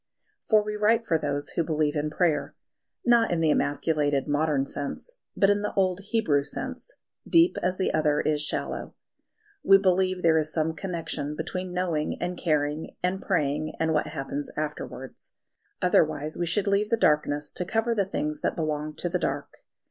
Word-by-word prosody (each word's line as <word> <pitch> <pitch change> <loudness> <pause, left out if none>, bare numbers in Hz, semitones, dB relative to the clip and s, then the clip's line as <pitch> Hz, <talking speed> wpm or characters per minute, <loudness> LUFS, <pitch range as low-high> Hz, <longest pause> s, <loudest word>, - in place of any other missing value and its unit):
For 215 -2 +5
we 210 0 -4
write 225 +2 +2
for 165 -6 +1
those 145 -1 -2
who 170 - -1
believe 155 -2 0
in 150 0 0
prayer 155 -2 0 0.5
not 235 -1 +4
in 175 - 0
the 160 -2 +3
emasculated 145 -1 +1
modern 145 -2 +1
sense, 145 - -6 0.2
but 195 0 +5
in 205 0 +1
the 210 - -3
old 185 -1 +2
Hebrew 205 -11 +1
sense, 255 - -6 0.3
deep 335 +1 +5
as 180 +1 0
the 190 - 0
other 150 -1 +2
is 150 -1 +1
shallow. 150 - -3 0.7
We 195 - +7
believe 185 -1 +1
there 160 -1 +5
is 155 0 -2
some 160 0 0
connection 165 -4 -3
between 185 +3 -4
knowing 175 -4 -1
and 180 0 -2
caring 150 -2 -1
and 185 +2 0
praying, 155 -3 0
and 160 0 +1
what 150 - +1
happens 140 +1 -4
afterwards. 150 -1 -6 0.5
Otherwise 155 -3 +2
we 175 - -2
should 190 +4 +1
leave 200 +1 +1
the 230 - +2
darkness 150 -4 +1
to - - -2
cover 225 +5 0
the 200 -3 +1
things 150 -5 -3
that - - 0
belong 155 -1 -2
to - - -3
the 180 +1 -1
dark. - - -3
165 Hz, 175 wpm, -26 LUFS, 150-195 Hz, 0.7 s, We